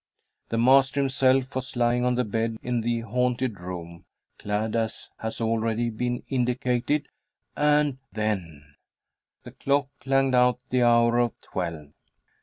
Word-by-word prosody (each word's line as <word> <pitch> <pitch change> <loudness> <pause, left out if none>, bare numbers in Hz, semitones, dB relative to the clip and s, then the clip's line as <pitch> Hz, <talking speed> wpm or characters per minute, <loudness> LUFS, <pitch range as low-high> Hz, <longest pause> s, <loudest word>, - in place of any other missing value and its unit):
The 115 - -1
master 130 +3 +4
himself 135 -1 +2
was 130 0 -5
lying 120 0 +2
on 125 0 +2
the 125 - +1
bed 115 +1 -2
in 120 -1 -1
the 115 0 -1
haunted 125 -1 -1
room, 85 -2 -8 0.3
clad 105 +2 -2
as 115 -1 -2
has 110 0 -5
already 115 +1 0
been 120 +2 -2
indicated, 125 +2 0 0.5
and 150 -2 +2
then 85 -10 -4 0.7
The - - -10
clock 140 0 0
clanged 135 0 +1
out 125 0 +4
the 125 0 +2
hour 120 0 +4
of 120 -1 0
twelve. 85 -5 -5
120 Hz, 135 wpm, -26 LUFS, 110-130 Hz, 0.7 s, master